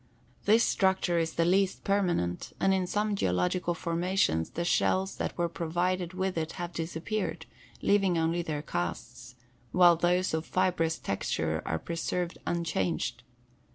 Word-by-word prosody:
This 225 Hz, +3 st, +5 dB
structure 190 Hz, -3 st, +2 dB
is 165 Hz, -1 st, -1 dB
the 165 Hz, -, +1 dB
least 190 Hz, +2 st, +2 dB
permanent 175 Hz, -, 0 dB
and 195 Hz, -, +3 dB
in 185 Hz, -1 st, 0 dB
some 210 Hz, +2 st, 0 dB
geological 95 Hz, -, 0 dB
formations 170 Hz, -, 0 dB
the 170 Hz, -, -3 dB
shells 190 Hz, +2 st, +1 dB
that -, -, -3 dB
were 175 Hz, 0 st, +1 dB
provided 175 Hz, +2 st, -1 dB
with 190 Hz, -2 st, -1 dB
it 160 Hz, 0 st, -3 dB
have 175 Hz, -1 st, -5 dB
disappeared, 170 Hz, +6 st, -3 dB, 0.4 s
leaving 195 Hz, -4 st, +3 dB
only 165 Hz, +1 st, +1 dB
their 150 Hz, -3 st, -3 dB
casts, 120 Hz, -, -5 dB, 0.4 s
while 175 Hz, -1 st, +6 dB
those 180 Hz, +2 st, +1 dB
of 160 Hz, 0 st, 0 dB
fibrous 180 Hz, -3 st, +1 dB
texture 100 Hz, -, -2 dB
are 80 Hz, -, 0 dB
preserved 170 Hz, -, -3 dB
unchanged. 120 Hz, -, -1 dB
170 Hz, 140 wpm, -29 LUFS, 160-185 Hz, 0.4 s, while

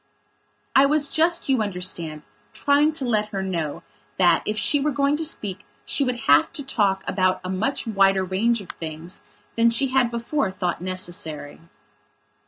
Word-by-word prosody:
I 270 Hz, +1 st, +6 dB
was 295 Hz, 0 st, +2 dB
just, 335 Hz, +2 st, +2 dB
you 265 Hz, -4 st, +2 dB
understand, 180 Hz, -6 st, -2 dB, 0.3 s
trying 290 Hz, +2 st, +2 dB
to 290 Hz, -4 st, -2 dB
let 215 Hz, -3 st, +1 dB
her 195 Hz, -2 st, -3 dB
know 170 Hz, -6 st, -3 dB, 0.3 s
that, 175 Hz, -3 st, +4 dB
if 215 Hz, -, -2 dB
she 290 Hz, -, +3 dB
were 300 Hz, -, +1 dB
going 280 Hz, 0 st, +1 dB
to 320 Hz, -, -3 dB
speak 205 Hz, -, -3 dB, 0.2 s
she 280 Hz, -, 0 dB
would 250 Hz, -3 st, -2 dB
have 145 Hz, -3 st, +4 dB
to 300 Hz, -4 st, -3 dB
talk 200 Hz, -7 st, 0 dB
about 185 Hz, -1 st, +1 dB
a 185 Hz, -, -4 dB
much 220 Hz, +9 st, -2 dB
wider 195 Hz, -3 st, +3 dB
range 210 Hz, +5 st, 0 dB
of 185 Hz, -, -13 dB
things 160 Hz, +2 st, -8 dB, 0.3 s
than 230 Hz, 0 st, +4 dB
she 245 Hz, +4 st, +2 dB
had 255 Hz, -2 st, +2 dB
before 235 Hz, +1 st, -2 dB
thought 180 Hz, -3 st, -3 dB
necessary. 170 Hz, -5 st, -3 dB
205 Hz, 170 wpm, -23 LUFS, 185-270 Hz, 0.3 s, I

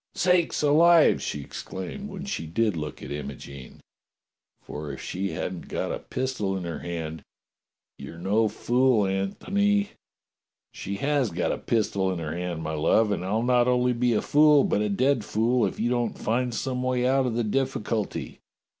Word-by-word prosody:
'*Sakes 180 Hz, -3 st, +2 dB
alive!" 165 Hz, +3 st, +5 dB
she 75 Hz, -, -3 dB
exclaimed 95 Hz, -, -7 dB
when 195 Hz, -1 st, -7 dB
she 140 Hz, -, -4 dB
did 105 Hz, +4 st, 0 dB
look 75 Hz, -1 st, -6 dB
at -, -, -7 dB
Imogene, 70 Hz, -2 st, -8 dB, 0.8 s
"for 75 Hz, -1 st, -6 dB
if 70 Hz, -, -8 dB
she 95 Hz, +2 st, -3 dB
hasn't 90 Hz, -2 st, -5 dB
got -, -, -3 dB
a -, -, -3 dB
pistol 125 Hz, -7 st, -2 dB
in 95 Hz, -, -5 dB
her 85 Hz, -3 st, -4 dB
hand, 80 Hz, -2 st, -5 dB, 0.8 s
you're 70 Hz, +4 st, -9 dB
no 105 Hz, +6 st, +2 dB
fool, 120 Hz, -1 st, +2 dB
Antony! 200 Hz, -, 0 dB, 0.4 s
" -, -, -59 dB
"She 100 Hz, -, -5 dB
has 140 Hz, +2 st, +1 dB
got 85 Hz, -, -1 dB
a -, -, -2 dB
pistol 100 Hz, -4 st, 0 dB
in 90 Hz, -, -3 dB
her 80 Hz, -1 st, -4 dB
hand, 90 Hz, -2 st, -4 dB
my 80 Hz, 0 st, -3 dB
love, 105 Hz, +8 st, +2 dB
and 90 Hz, -3 st, -1 dB
I'll 105 Hz, +5 st, 0 dB
not 125 Hz, 0 st, +3 dB
only 125 Hz, 0 st, +2 dB
be 120 Hz, 0 st, +1 dB
a 105 Hz, -, 0 dB
fool, 150 Hz, -1 st, +5 dB
but 105 Hz, -, +1 dB
a 105 Hz, -, 0 dB
dead 125 Hz, +4 st, +2 dB
fool, 115 Hz, +4 st, +1 dB
if -, -, -7 dB
you 120 Hz, +2 st, 0 dB
don't 120 Hz, -2 st, -1 dB
find 120 Hz, +2 st, 0 dB
some 125 Hz, +2 st, -2 dB
way 125 Hz, -1 st, 0 dB
out 130 Hz, 0 st, +2 dB
of 115 Hz, -, -2 dB
the 120 Hz, -, +1 dB
difficulty." 115 Hz, -2 st, -2 dB
110 Hz, 180 wpm, -26 LUFS, 90-130 Hz, 0.8 s, alive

